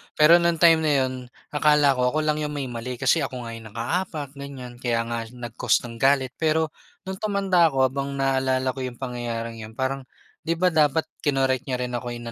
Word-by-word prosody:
Pero 165 +3 +7
nung 170 -1 +2
time 165 0 +6
na 155 -2 +1
yun, 130 0 -2 0.4
akala 150 -1 +4
ko 125 +3 +1
ako 155 - +1
lang 155 0 0
yung 150 -1 -3
may 140 - -2
mali 120 +2 -5
kasi 160 - +2
ako 130 -3 -4
nga 115 - -6
yung 110 - -11
nakaapak, 150 +3 -2
ganiyan, 130 -3 -8
kaya 115 -2 0
nga 115 0 -3 0.2
nag-cause 120 0 0
ng 115 -1 -8
galit. 135 -1 +3
Pero 160 0 +1 0.3
nung 190 0 -6
tumanda 195 -5 +3
ako 135 -3 +1
habang 140 +1 -1
naalala 130 -1 +1
ko 135 - -9
yung 125 - -8
pangyayaring 115 -3 -5
yun 110 - -15
parang, 130 0 -2 0.4
di 165 - +2
ba 180 +1 +2
dapat 155 0 +3 0.2
kinorek 135 -2 +1
niya 130 - -1
rin 125 0 -3
ako 120 0 -4
in 120 0 -7
135 Hz, 205 wpm, -24 LUFS, 125-155 Hz, 0.4 s, Pero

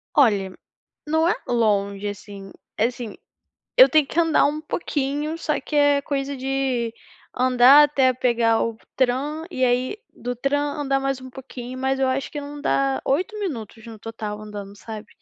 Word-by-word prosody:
Olha, 205 -8 +3 0.5
não 320 +1 +2
é - - +4
longe 205 -4 +1
assim, 200 -1 -8 0.3
é 225 - +3
assim, 240 -4 -7 0.6
eu - - +10
tenho 310 -2 +4
que 335 - -1
andar 325 -2 +4
um 295 +1 0
pouquinho 300 0 -2
só 305 -2 -1
que 300 - -11
é 290 -1 +4
coisa 280 0 -3
de 260 -3 -1 0.4
andar 255 +3 +7
até 270 -3 +3
pegar 235 -2 +2
o 230 -1 -3 0.2
tram 275 +5 0
e 260 - -1
aí 250 +9 +1 0.2
do 245 +1 -5
tram 275 +4 0 0.2
andar 275 -1 +1
mais 270 -1 -2
um 260 - -9
pouquinho, 255 -1 -8
mas 265 +1 0
eu 265 - +2
acho 265 +1 -2
que 295 - -5
não 290 +1 -8
dá 275 -2 +1
8 370 +10 0
minutos 230 - -5
no 225 -1 -9
total 215 -2 -6
andando, 205 -1 -8
sabe. 215 -1 -8
260 Hz, 170 wpm, -23 LUFS, 230-285 Hz, 0.6 s, eu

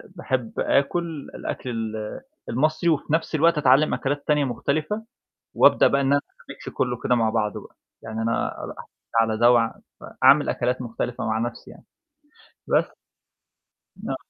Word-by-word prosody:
باحب 130 -9 -2
آكل 160 +1 0
الأكل 125 - -5
ال 110 -2 -4 0.3
المصري 155 +6 +1
وفي 155 -1 0
نَفس 160 0 0
الوقت 165 +1 +3
أتعلّم 140 +2 +4
أكلات 145 +1 -2
تانية 150 -2 +3
مختلفة، 155 - -2 0.5
وأبدأ - - +5
بقى 140 - +1
إن 135 - 0
أنا 140 +1 +3 0.3
أميكس - - -9
كُلّه 120 -2 0
كده 125 - +3
مع 115 -2 +2
بعضه 105 -2 -1
بقى، - - -17 0.3
يعني 110 0 -5
أنا 115 +1 -2
اب - - -7 0.5
على 110 -1 +1
ده 120 +1 +6
وع 115 -2 +2 0.3
فأعمِل - - +4
أكلات 125 +1 -1
مختلفة 120 +1 -4
مع 110 0 0
نَفسي 120 +1 -5
يعني. - - -15 0.8
بس. - - +1 1.1
ن - - -2
130 Hz, 150 wpm, -24 LUFS, 115-150 Hz, 1.1 s, ده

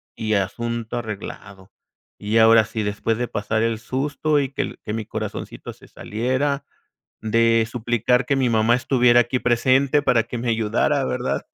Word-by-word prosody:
y 110 -2 -1
asunto 115 +4 -3
arreglado. 100 -3 -8 0.5
Y 105 +2 -1
ahora 115 0 +6
sí, 110 0 -4
después 105 +2 -1
de 125 - -2
pasar 110 +1 -2
el 115 -1 -1
susto, 145 +5 -1
y 135 - -1
que - - -1
el - - -6
que 105 - -3
mi 110 -1 -4
corazoncito - - -6
se - - -18
saliera, 130 +6 -2 0.6
de 115 0 +2
suplicar 120 +1 0
que 140 - 0
mi 130 -2 +1
mamá 115 +1 +3
estuviera 125 -1 +4
aquí 120 +2 0
presente 130 +4 +2
para 125 -5 +2
que 120 +1 -6
me 120 +1 -3
ayudara, 110 -2 +1
¿verdad? 65 - -2
115 Hz, 165 wpm, -22 LUFS, 110-125 Hz, 0.6 s, ahora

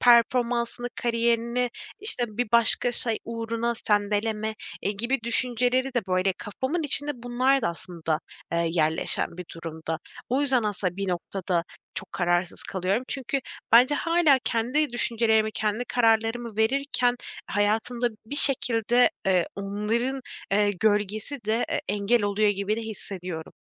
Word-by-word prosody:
performansını 240 0 +3
kariyerini, 235 +1 0 0.3
işte, 400 - +3
bir 220 +2 -3
başka 235 +1 +5
şey 230 -3 -1
uğruna 230 +1 -2
sendeleme, 210 +1 0 0.3
eee, 200 - 0
gibi 235 +6 -1
düşünceleri 250 +2 +1
de 235 -5 -1
böyle 185 +1 +1
kafamın 260 - -3
içinde 290 0 +2
bunlar 250 +2 +1
da - - +1
aslında, 165 -2 -4 0.3
eee, 170 0 +1
yerleşen 160 +1 +1
bir 180 - -6
durumda. 160 -1 -5 0.3
O 260 +3 +1
yüzden 265 -4 +2
aslında 195 -4 -2
bir 195 -1 -3
noktada 180 -1 -2 0.3
çok - - -6
kararsız 175 0 0
kalıyorum. 195 +6 -1
Çünkü 275 0 -1 0.3
bence 250 +5 +7
hâlâ 330 -3 +3
kendi 255 +6 +1
düşüncelerimi, 220 -2 +1
kendi 215 +3 -1
kararlarımı 225 -1 +1
verirken 245 +1 +1 0.3
hayatımda 220 +4 0 0.2
bir 285 +6 -4
şekilde, 245 0 +5 0.2
eee, 185 -3 +3
onların, 215 +7 -2 0.3
eee, 205 +1 +3
gölgesi 215 +5 0
de 220 +3 +1
e - - -1
engel 205 +3 +1
oluyor 205 +1 +2
gibi 200 +1 -1
de 230 - -3
hissediyorum. 185 -6 -6
225 Hz, 130 wpm, -26 LUFS, 200-245 Hz, 0.3 s, bence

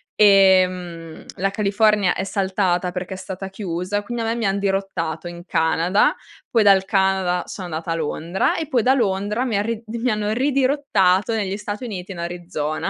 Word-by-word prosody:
ehm, 185 -5 +3
la 195 +2 +1
California 205 -1 +2
è 190 - -3
saltata 190 -2 0
perché 185 +1 -5
è - - -8
stata 190 0 -7
chiusa 190 +1 -3
quindi 240 +2 -4
a - - -2
me 225 - 0
mi 230 -2 -2
han 195 +1 +1
dirottato 195 -4 -2
in 175 0 -9
Canada, 165 +4 +2 0.4
poi 230 - +4
dal 195 -2 +5
Canada 190 -3 +1
sono 185 - -7
andata 160 +1 -5
a 165 - 0
Londra 165 +3 -1
e 320 - -3
poi 250 -6 +1
da 260 +3 +4
Londra 210 0 0
mi 225 -6 -1
han 205 - +1
rid 230 -1 -3
mi 235 +2 -1
hanno 210 0 -1
ridirottato 255 -7 +2
negli 200 -2 -2
Stati 210 +2 -6
Uniti 195 -4 -6
in 180 - -7
Arizona. 170 -3 -3
195 Hz, 180 wpm, -21 LUFS, 180-210 Hz, 0.4 s, dal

